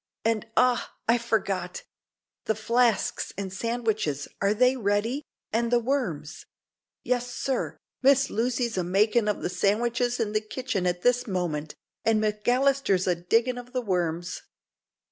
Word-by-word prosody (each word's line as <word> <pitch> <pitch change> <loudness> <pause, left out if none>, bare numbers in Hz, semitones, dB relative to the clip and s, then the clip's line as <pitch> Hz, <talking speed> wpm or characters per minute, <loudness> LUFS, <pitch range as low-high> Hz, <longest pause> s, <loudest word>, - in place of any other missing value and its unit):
"And, 225 -1 +1
ah! 250 -1 +2
I 235 +2 +4
forgot 225 - -1 0.6
the 220 - +1
flasks 230 +1 +1
and 195 -1 -4
sandwiches 215 - -1
are 200 +1 +2
they 250 +4 +4
ready, 225 +4 0 0.3
and 235 +1 +1
the 240 - +5
worms?" 205 - -2 0.6
"Yes, 245 0 -1
sir; 265 +1 -2 0.2
Miss 275 0 +4
Lucy's 235 -2 0
a - - 0
makin' 210 +5 +2
of 210 - -1
the - - +1
san'wiches 235 +6 +1
in 220 -3 0
the 215 0 +1
kitchen 215 -4 -2
at 175 0 -1
this 245 0 +3
moment, 170 -6 -2 0.3
and 225 -1 +3
Maclister's 215 0 +2
a 180 - +3
diggin' 230 +9 +1
of 245 +1 -12
the 255 - 0
worms." 175 -3 -1
225 Hz, 145 wpm, -27 LUFS, 195-245 Hz, 0.6 s, the